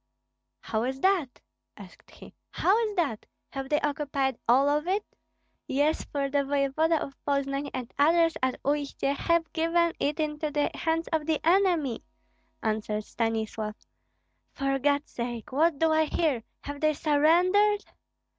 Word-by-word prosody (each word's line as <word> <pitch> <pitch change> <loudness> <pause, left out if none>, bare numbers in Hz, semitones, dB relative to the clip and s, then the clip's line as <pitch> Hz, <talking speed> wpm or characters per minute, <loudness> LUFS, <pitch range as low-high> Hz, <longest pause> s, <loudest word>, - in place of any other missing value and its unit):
"How 220 - -2
is 260 +3 -2
that?" 370 -9 +1 0.4
asked - - -14
he, - - -14 0.2
"how 385 - +2
is 420 - -6
that? 285 -12 -1 0.2
Have 270 -1 -5
they 295 - +2
occupied 280 -3 -1
all 265 +4 +5
of 300 +3 +1
it?" 400 +3 0 0.6
"Yes, 290 +4 +1
for 280 -1 -2
the 280 0 +1
voevoda 285 +4 +1
of 275 - -6
Poznan 280 0 -1
and 255 -2 -6
others 330 +2 +4
at 260 0 0
Uistsie 285 -1 -1
have 335 +2 0
given 335 +1 +2
it 295 +3 -1
into 300 0 -1
the 295 0 0
hands 330 0 -1
of 315 -1 0
the 315 -2 +1
enemy," 340 - +2 0.6
answered 215 -1 -1
Stanislav. 220 -1 -2 0.8
"For 275 -1 -1
God's 285 +1 +1
sake! 235 -1 -5
What 310 +3 +2
do 320 +2 +2
I 315 0 +3
hear? 300 -6 0 0.2
Have 285 0 -7
they 310 0 +3
surrendered?" 355 +8 +3
290 Hz, 145 wpm, -27 LUFS, 270-325 Hz, 0.8 s, all